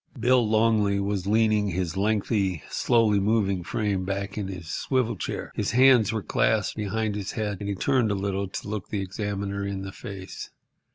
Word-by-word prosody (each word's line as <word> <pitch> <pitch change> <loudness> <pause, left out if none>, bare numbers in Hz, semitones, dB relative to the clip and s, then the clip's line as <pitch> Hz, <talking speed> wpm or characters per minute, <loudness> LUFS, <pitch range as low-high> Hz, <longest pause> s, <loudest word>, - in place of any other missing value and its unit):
Bill 125 +1 +4
Longley 110 -2 +3
was 100 -1 -2
leaning 110 -1 +3
his 90 -2 -2
lengthy, 100 - 0
slowly 110 -4 +3
moving 100 -3 +1
frame 100 0 -1
back 100 +1 -3
in 105 -3 -3
his 90 -4 -7
swivel 120 - 0
chair. - - -5
His - - -2
hands 125 -4 +6
were 110 -3 -2
clasped 110 -2 +1
behind 110 0 -1
his 100 -1 -4
head, 105 -2 -2
and 100 - -4
he 100 - -1
turned 125 +2 +2
a 100 - +1
little 100 0 -2
to 95 - -6
look 105 -2 -4
the 105 - -2
examiner 100 0 -3
in 100 -1 -3
the 95 - -6
face. 95 -1 -8
100 Hz, 180 wpm, -26 LUFS, 95-110 Hz, -, hands